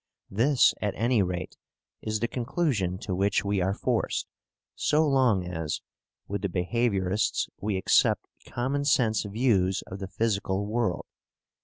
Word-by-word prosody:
This, 125 +6 +4
at 105 -2 -1
any 115 0 +2
rate, 90 -1 -3 0.4
is 110 0 -2
the 120 - +1
conclusion 120 - -1
to 95 - -3
which 100 +2 +1
we 100 -1 +1
are 95 +2 0
forced, - - -1 0.5
so 155 +1 +2
long 125 -9 +3
as, 80 -3 -3 0.5
with 100 -1 -3
the 100 - -1
behaviourists, 95 +1 0
we 105 -1 -1
accept 95 - +3 0.2
common 135 +4 -1
sense 115 -6 +2
views 100 -4 +1
of 95 - -8
the 95 - -5
physical 100 -1 -1
world. 110 -5 -1
105 Hz, 140 wpm, -27 LUFS, 95-120 Hz, 0.5 s, This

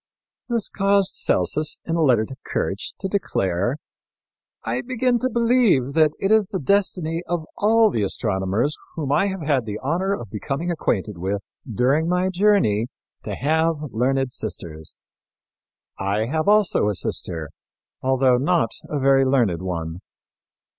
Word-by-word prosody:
This 235 -3 0
caused 195 -1 +2
Celsus, 150 - 0
in 165 - -1
a 165 - +1
letter 125 -7 +4
to 135 - -9
Kirch, 95 +2 -3
to 195 - -1
declare 120 - -1 0.9
"I 120 +3 -1
begin 250 - 0
to 255 - 0
believe 230 - +3
that 155 -1 +4
it 195 - 0
is 220 -3 +4
the 200 - -3
destiny 175 -1 +1
of 175 -2 -2
all 220 +1 +4
the 110 - -1
astronomers 100 +6 0 0.2
whom 145 -4 -3
I 195 +7 +3
have 190 -2 -4
had 140 -6 +1
the 105 0 -3
honor 180 +8 0
of 110 -5 -9
becoming 140 - -3
acquainted 105 - -2
with 100 +3 -2 0.3
during 135 +9 +2
my 180 +1 +1
journey 185 - +2 0.4
to - - -3
have 160 +4 +1 0.2
learned 130 +2 0
sisters. 85 -7 -5 1.0
I 100 +3 0
have 155 - -1
also 210 - +3
a 105 - -1
sister, 80 -4 -4 0.5
although 130 -1 +3
not 145 -2 +1 0.2
a 150 - -2
very 135 0 +4
learned 120 -11 +2
one. 85 -2 -4
140 Hz, 145 wpm, -22 LUFS, -, 1.0 s, letter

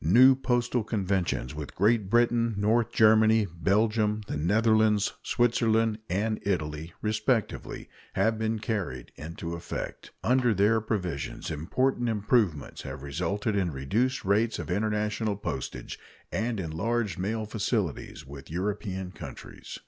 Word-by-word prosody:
New 125 - +7
postal 120 -2 0
conventions 95 - -1
with 75 -1 -7
Great 105 0 +2
Britain, 120 0 +3
North 110 +3 +2
Germany, 110 0 +5
Belgium, 105 +5 +1
the - - -4
Netherlands, 105 +5 +3
Switzerland, 115 -2 +2
and 105 +5 0
Italy, 80 -4 -2
respectively, 110 +2 -1 0.3
have 110 -1 +1
been 110 0 0
carried 100 - -3
into 85 +2 -6
effect. 85 - -6
Under 125 -2 +3
their 105 +4 +3
provisions 90 - -3
important 120 - 0
improvements 105 - 0
have - - -7
resulted 100 - -2
in 95 -3 +1
reduced 105 - -1
rates 105 +4 +2
of - - -5
international 105 +1 0
postage 70 -9 -5 0.3
and 110 0 -1
enlarged 100 +6 -1
mail 110 +3 -1
facilities 105 - -2
with 70 0 -11
European 95 +1 -3
countries. - - -9
105 Hz, 120 wpm, -28 LUFS, 90-115 Hz, 0.3 s, New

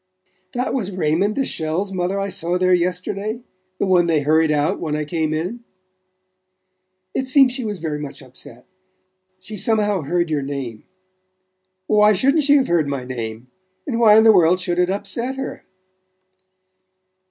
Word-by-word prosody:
"That 250 +1 -2
was 220 -8 -2
Raymond 185 +2 0
de 270 - 0
Chelles' 165 +3 -2
mother 185 +1 -2
I 195 0 -2
saw 175 -1 -1
there 185 0 +2
yesterday? 190 +6 -2 0.3
The - - 0
one 180 -2 +3
they 160 -3 +2
hurried 155 +2 +2
out 150 +5 0
when 155 -3 -3
I 150 0 -2
came 160 0 -2
in?" 175 +10 -3 1.5
"It 265 0 -2
seems 270 -1 +5
she 255 0 -4
was 210 -3 -4
very 155 -3 -4
much 145 -1 -8
upset. 125 -1 -12 0.7
She 210 +3 -9
somehow 210 -1 +1
heard 170 +3 -1
your 150 -2 0
name." 135 -5 -6 1.0
"Why 210 +1 +4
shouldn't 275 - +2
she 285 0 +5
have 270 -2 +3
heard 170 -4 +1
my 140 -3 -4
name? 120 -1 -6 0.3
And 240 -5 -2
why 215 -2 +6
in 220 - +6
the 220 -1 +7
world 180 -1 +4
should 180 -1 -1
it 180 0 +2
upset 210 +6 -2
her?" 270 0 -6
180 Hz, 165 wpm, -20 LUFS, 155-215 Hz, 1.5 s, the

